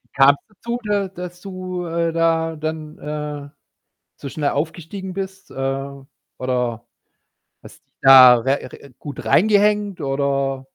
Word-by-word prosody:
kam's 140 +1 +6
dazu, 235 +4 -5
da 205 -2 0
dass 180 -1 -9
du, 185 -2 -6
äh, 165 0 -1
da 165 -1 +1
dann, 155 0 -5
äh, 150 -1 -5 0.7
so 140 - -8
schnell 145 0 -1
aufgestiegen 170 +5 -4
bist, 190 0 -7
äh? 135 +1 -3 0.5
Oder 125 -2 -2 0.8
hast - - -15
dich - - -48
da 130 -2 +9
re 135 +4 0
re 140 - -14
gut 145 - -8
reingehängt 205 0 +3
oder 135 -1 -1
155 Hz, 130 wpm, -21 LUFS, 135-185 Hz, 0.8 s, da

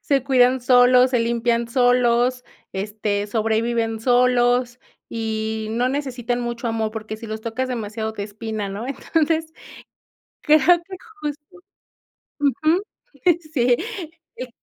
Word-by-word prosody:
Se 275 -3 +1
cuidan 255 -1 +3
solos, 250 +1 +5
se 245 - +2
limpian 235 0 0
solos, 245 0 +2 0.3
este, 205 +1 -2
sobreviven 225 +1 0
solos, 245 0 +2 0.3
y 220 -1 -3
no 240 +3 0
necesitan 255 -3 -2
mucho 235 0 -3
amor, 220 -1 -1
porque 215 -1 -6
si 225 +1 -9
los 215 0 -5
tocas 245 +3 -3
demasiado 220 -2 -4
te 205 - -5
espina, 210 0 -5
¿no? 205 +5 -5
Entonces 320 +3 -1 0.9
creo 305 0 +5 0.3
que 380 +1 -9 0.2
justo 295 +4 -7 0.8
ujú, 310 +5 +1 0.7
sí. 245 -4 +3 0.6
Y 255 - -6
240 Hz, 120 wpm, -22 LUFS, 220-255 Hz, 0.9 s, solos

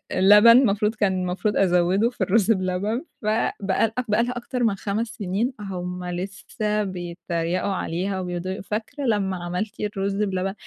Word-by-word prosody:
لبن 210 +4 +8
المفروض، 215 -3 +2
كان 205 -3 +1
المفروض 180 +3 -1
أزوِِّده 185 +4 +3
في 245 - -13
الرز 200 +3 +3
بلبن، 190 +4 0 0.2
فبقى 215 0 0 0.2
بقي 210 +3 +3
لها 245 - -2
أكتر 245 +1 -3
من 220 -4 +2
5 205 +4 -2
سنين، 210 +5 -2
هُم 180 -2 -5
لسّه 195 +4 -3
بيتَّريقوا 175 0 -3
عليها 190 +2 -2
وبيفضَلوا 180 0 -3
يقو - - -8
فاكرة 220 +8 -4
لمّا 195 -5 0
عملتِ 180 +5 -4
الرز 200 -1 -2
بلبن. 190 -1 -1
195 Hz, 145 wpm, -24 LUFS, 180-215 Hz, 0.2 s, لبن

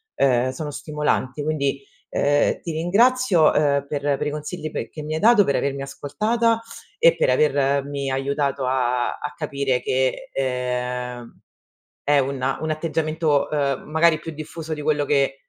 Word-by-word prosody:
ehm, 130 -1 +2
sono 145 +3 -5
stimolanti. 150 -2 -2
Quindi, 140 -3 -1 0.2
ehm, 145 0 +1
ti 170 - -4
ringrazio, 200 +3 +3
uhm, 140 -2 +2
per 145 -1 -3 0.2
per - - -3
i 150 - -1
consigli 155 +1 -5
pe - - -4
che 155 - -8
mi 155 +1 -4
hai 155 - -1
dato, 220 -2 +6
per 140 - 0
avermi 140 0 -2
ascoltata, 225 - 0 0.4
e - - +6
per - - +1
avermi 140 -1 +1
aiutato 140 0 -1
a 125 -1 +1
a 150 - -6
capire 140 -4 -1
che, 130 0 -1
ehm, 125 -2 -3 0.7
è 145 0 +4
un 135 0 -2
un 155 0 -2
atteggiamento, 155 -1 0
uhm, 140 -3 0
magari 160 0 +3
più 165 - -6
diffuso 155 +1 -6
di 150 - -7
quello 145 -1 +1
che 140 -2 +2
145 Hz, 155 wpm, -22 LUFS, 135-155 Hz, 0.7 s, dato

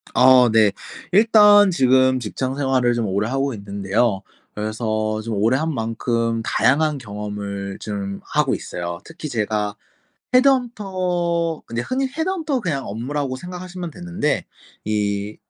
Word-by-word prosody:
어 125 -1 +7
네. 110 -2 +4 0.4
일단 210 -1 +6
지금 130 -3 +3
직장 130 +3 -3
생활을 130 -3 +1
좀 115 -2 -1
오래 100 +3 -1
하고 135 +1 -1
있는데요. 100 +1 -1 0.3
그래서 110 0 -2
좀 110 0 -4
오래 115 +6 +2
한 160 +2 -1
만큼 115 0 -1
다양한 150 +6 +2
경험을 105 -3 -6
좀 100 -2 -5
하고 - - +1
있어요. 85 0 -5
특히 160 -2 -8
제가 105 -2 -1 0.6
헤드헌터 185 - +1
근데 115 +1 -3
흔히 265 - -1
헤드헌터 320 -2 -2
그냥 155 - -2
업무라고 130 +5 -3
생각하시면 180 +2 -7
되는데 175 -4 -2 0.4
이 105 -1 -1
130 Hz, 280 characters per minute, -21 LUFS, 105-170 Hz, 0.6 s, 어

